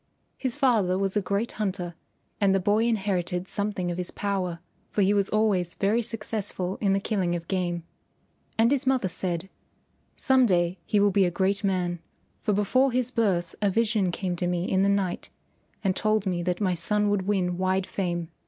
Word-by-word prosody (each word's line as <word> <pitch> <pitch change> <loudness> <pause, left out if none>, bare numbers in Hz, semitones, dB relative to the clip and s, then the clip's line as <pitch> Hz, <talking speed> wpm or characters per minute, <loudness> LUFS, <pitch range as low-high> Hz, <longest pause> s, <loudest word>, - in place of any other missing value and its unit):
His 260 -3 -2
father 225 -10 +2
was 195 0 -1
a 210 - +3
great 200 +4 -1
hunter 185 -4 -3 0.5
and 195 -2 +3
the - - +3
boy 205 +4 +2
inherited 190 -5 -1
something 200 -4 -2
of 175 - -4
his 180 - -1
power, 190 -4 -2 0.3
for 205 - +1
he 195 +2 +3
was 200 -1 +1
always 200 -5 +1
very 210 +4 +2
successful 210 -4 -3
in 195 -2 +3
the 195 - +2
killing 190 -4 0
of 170 -1 -6
game. 175 -3 -1 0.7
And 230 +2 +4
his 275 -1 +1
mother 260 -7 +2
said, 175 0 -3 0.7
"Some 260 -2 +4
day 175 -1 +1
he 210 - +2
will 205 0 +4
be 195 0 +4
a - - +2
great 195 +3 0
man, 180 -3 0 0.4
for 215 - 0
before 230 +7 +2
his 250 0 0
birth 185 -8 0
a 205 - +3
vision 215 -2 +1
came 180 0 -2
to 175 - -1
me 175 -1 0
in 190 - +2
the 200 - +3
night 195 -3 -1 0.5
and 190 -2 +1
told 215 -1 +1
me 180 -2 -1
that 180 0 -1
my 190 -4 +1
son 210 +4 +1
would 195 -2 0
win 180 -3 0
wide 185 0 +1
fame. 175 -4 -3
195 Hz, 190 wpm, -26 LUFS, 180-210 Hz, 0.7 s, And